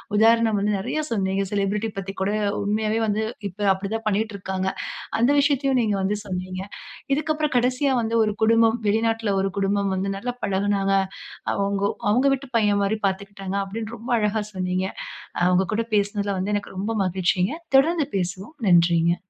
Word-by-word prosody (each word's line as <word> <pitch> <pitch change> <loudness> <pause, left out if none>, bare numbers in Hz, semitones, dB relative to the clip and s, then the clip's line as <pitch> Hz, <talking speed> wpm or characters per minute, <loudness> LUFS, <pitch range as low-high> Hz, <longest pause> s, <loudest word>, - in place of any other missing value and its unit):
உதாரணம் 225 0 +4
வந்து 210 +1 +1
நிறையா 305 +10 -2
சொன்னிங்க. 195 -2 0
செலிபிரிட்டி 205 +2 0
பத்தி 195 0 -4
கூட 195 +2 +1 0.3
உண்மையாவே 215 +2 0
வந்து, 215 +1 0 0.3
இப்ப 205 +3 -4
அப்டி 195 +1 -5
தான் 225 0 -5
பண்ணிட்டிருக்காங்க. 195 -3 -1 0.5
அந்த 240 +3 +4
விஷயத்தையும் 275 -2 +2
நீங்க 210 -3 +1
வந்து 200 +2 0
சொன்னிங்க. 185 -1 -4 0.5
இதுக்கு 310 +2 0
அப்பறம் 300 -3 -1
கடைசியா 255 +3 +2
வந்து 230 0 0
ஒரு 210 -1 0
குடும்பம், 225 +1 +4
வெளிநாட்ல 225 0 +1
ஒரு 195 0 -1
குடும்பம் 200 0 +1
வந்து 195 +1 -1
நல்லா 245 +5 -3
பழகுனாங்க. 195 0 +1 0.6
அவங்கோ 200 0 0 0.2
அவங்க 245 +6 +3
வீட்டு 275 0 -4
பையன் 205 -2 +2
மாரி 210 +2 0
பார்த்துக்கிட்டாங்க. 195 0 -4
அப்டின்னு 220 +3 -5
ரொம்ப 235 +3 -6
அழகா 210 0 0
சொன்னிங்க. 185 0 -1 0.5
அ - - +1
உங்க 185 +1 +3
கூட 230 - +1
பேசினதில 205 -1 0
வந்து 200 +3 -1
எனக்கு 200 -1 -4
ரொம்ப 205 +4 -2
மகிழ்ச்சிங்க. 185 - +1 0.2
தொடர்ந்து 310 +1 +3
பேசுவோம். 185 - -4
நன்றிங்க. 170 -1 +4
205 Hz, 160 wpm, -24 LUFS, 195-225 Hz, 0.6 s, உதாரணம்